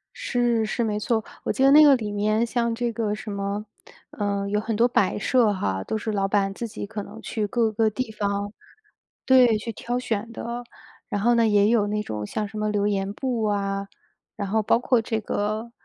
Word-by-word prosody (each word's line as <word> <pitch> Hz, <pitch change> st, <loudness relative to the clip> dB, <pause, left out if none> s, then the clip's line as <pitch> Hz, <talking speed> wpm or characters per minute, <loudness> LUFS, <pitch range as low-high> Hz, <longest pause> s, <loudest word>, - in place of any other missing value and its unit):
是， 240 Hz, -, 0 dB
是 225 Hz, +2 st, -1 dB
没 210 Hz, -2 st, -1 dB
错。 220 Hz, +1 st, 0 dB, 0.2 s
我 -, -, 0 dB
记 265 Hz, -, 0 dB
得 275 Hz, -, +6 dB
那 305 Hz, +2 st, +9 dB
个 285 Hz, -2 st, +7 dB
里 215 Hz, -4 st, -4 dB
面 215 Hz, +2 st, +1 dB
像 235 Hz, 0 st, 0 dB
这 240 Hz, +1 st, -1 dB
个 220 Hz, -2 st, -1 dB
什 210 Hz, 0 st, -7 dB
么， 200 Hz, +1 st, -3 dB, 0.5 s
呃， 200 Hz, -1 st, -2 dB
有 210 Hz, +1 st, +1 dB
很 220 Hz, +1 st, -2 dB
多 235 Hz, +3 st, +4 dB
摆 205 Hz, -5 st, +1 dB
设 220 Hz, 0 st, +3 dB
哈， 95 Hz, -, -2 dB
都 220 Hz, -, -2 dB
是 220 Hz, +1 st, -3 dB
老 195 Hz, -2 st, 0 dB
板 195 Hz, -1 st, +1 dB
自 235 Hz, +4 st, -5 dB
己 215 Hz, -1 st, -6 dB
可 210 Hz, 0 st, -6 dB
能 220 Hz, +3 st, -11 dB
去 215 Hz, -1 st, -2 dB
各 225 Hz, +1 st, +1 dB
个 220 Hz, +1 st, +2 dB
地 225 Hz, +2 st, -4 dB
方 205 Hz, -1 st, -2 dB, 0.7 s
对， 250 Hz, -4 st, +6 dB
去 230 Hz, +2 st, -5 dB
挑 240 Hz, +3 st, -3 dB
选 225 Hz, -2 st, -3 dB
的。 235 Hz, +1 st, -5 dB, 0.5 s
然 205 Hz, -, -1 dB
后 240 Hz, +3 st, +4 dB
呢 230 Hz, -1 st, +4 dB
也 205 Hz, -1 st, +4 dB
有 220 Hz, -3 st, +3 dB
那 210 Hz, 0 st, -1 dB
种 105 Hz, -, -5 dB
像 210 Hz, -, -3 dB
什 215 Hz, +2 st, -9 dB
么 215 Hz, 0 st, 0 dB
留 205 Hz, -1 st, 0 dB
言 195 Hz, -1 st, -1 dB
簿 240 Hz, -1 st, -2 dB
啊， 200 Hz, -1 st, -1 dB, 0.5 s
然 200 Hz, -2 st, -4 dB
后 220 Hz, +2 st, +2 dB
包 210 Hz, -, +3 dB
括 245 Hz, -1 st, +2 dB
这 225 Hz, 0 st, -2 dB
个 215 Hz, +2 st, -2 dB
215 Hz, 230 characters per minute, -24 LUFS, 205-235 Hz, 0.7 s, 那